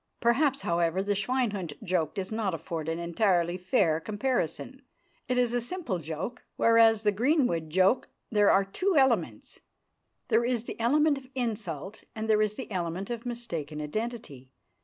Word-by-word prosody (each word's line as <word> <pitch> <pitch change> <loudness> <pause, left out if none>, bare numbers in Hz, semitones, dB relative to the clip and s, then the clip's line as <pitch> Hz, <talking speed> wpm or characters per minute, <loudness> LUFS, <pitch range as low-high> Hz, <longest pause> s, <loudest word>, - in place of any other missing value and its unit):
Perhaps, 270 +4 +2
however, 170 +2 +1
the 205 +1 0
"Schweinhund" 205 - -1
joke 175 -3 -1
does 195 -1 -4
not 215 -5 -1
afford 160 0 -5
an 165 - -1
entirely 175 0 +1
fair 180 -3 +1
comparison. 220 - -2 0.5
It 250 - 0
is 245 -1 +2
a 245 - +1
simple 245 - -3
joke, 165 +10 -5
whereas 225 -1 +5
in 210 - +4
the - - -13
Greenwood 245 - +1
joke 190 +8 +2 0.2
there 210 -2 +4
are 195 0 +4
two 370 - -1
elements. 265 -1 +1 0.7
There 230 0 +3
is 240 -2 0
the - - -8
element 290 +5 +3
of 260 - -17
insult, 210 - -4
and 220 0 -3
there 215 -1 +4
is 210 -1 0
the 260 - -7
element 180 +3 -3
of 235 +1 -5
mistaken 165 -11 -5
identity. 150 - -5
210 Hz, 160 wpm, -28 LUFS, 170-240 Hz, 0.7 s, whereas